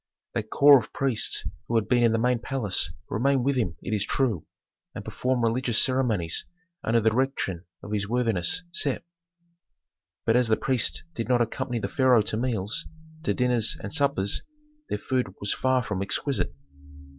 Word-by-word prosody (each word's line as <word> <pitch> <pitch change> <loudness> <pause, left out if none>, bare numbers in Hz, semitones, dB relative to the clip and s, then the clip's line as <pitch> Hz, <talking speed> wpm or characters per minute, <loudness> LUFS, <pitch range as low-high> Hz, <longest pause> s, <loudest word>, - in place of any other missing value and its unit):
That 110 -2 -3
corps 140 -1 +7
of 110 - -9
priests 135 -5 0 0.2
who 120 - -1
had 110 -2 +2
been 125 -1 +3
in 115 -1 +4
the 115 - +2
main 125 +1 +2
palace 115 -7 -1 0.2
remained 135 +4 +1
with 140 +1 +1
him 105 -10 -1
it - - -3
is 105 -2 +1
true, 110 - -1 0.5
and - - -7
performed 125 -1 -1
religious 115 0 +1
ceremonies 120 - +1 0.4
under 115 +1 +3
the 110 0 +3
direction 110 -8 -1 0.2
of 100 - -8
his 100 -1 -1
worthiness 115 - +1
Sem. 140 -5 0 1.2
But 115 - +3
as 125 -1 +4
the 110 - +3
priests 130 -4 0
did 115 -5 -4
not 125 -1 +4
accompany 120 +1 -2
the 115 - -2
pharaoh 130 -7 +4
to 105 - -1
meals, 110 -4 -1 0.3
to - - 0
dinners 125 -3 +1
and - - -6
suppers, 140 -10 +1 0.5
their - - -1
food 125 -8 -2
was 100 - 0
far 130 -1 +1
from 105 -5 -3
exquisite. 100 - -1
120 Hz, 170 wpm, -26 LUFS, 105-130 Hz, 1.2 s, corps